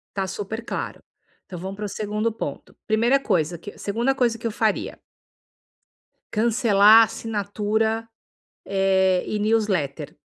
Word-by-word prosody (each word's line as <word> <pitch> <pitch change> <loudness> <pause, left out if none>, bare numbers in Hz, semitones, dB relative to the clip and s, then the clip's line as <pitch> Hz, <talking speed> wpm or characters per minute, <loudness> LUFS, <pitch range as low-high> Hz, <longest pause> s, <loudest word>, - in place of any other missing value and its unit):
Está 195 -1 -1
super 210 +4 -5
claro. - - -5 0.4
Então 180 - -8
vamos 190 +3 -6
pro 210 0 -5
segundo 210 +3 -2
ponto. 145 -10 -7
Primeira 235 +5 +3
coisa 170 - 0
que, 200 +5 -10
segunda 235 +6 0
coisa 245 -4 +1
que 235 - -11
eu 230 - 0
faria. 215 -1 -1 1.3
Cancelar 220 -1 +5
a - - +7
assinatura, 220 0 -2 0.6
eh, 190 -1 +2
e 210 - -2
newsletter. 205 -10 -1
210 Hz, 130 wpm, -23 LUFS, 195-225 Hz, 1.3 s, a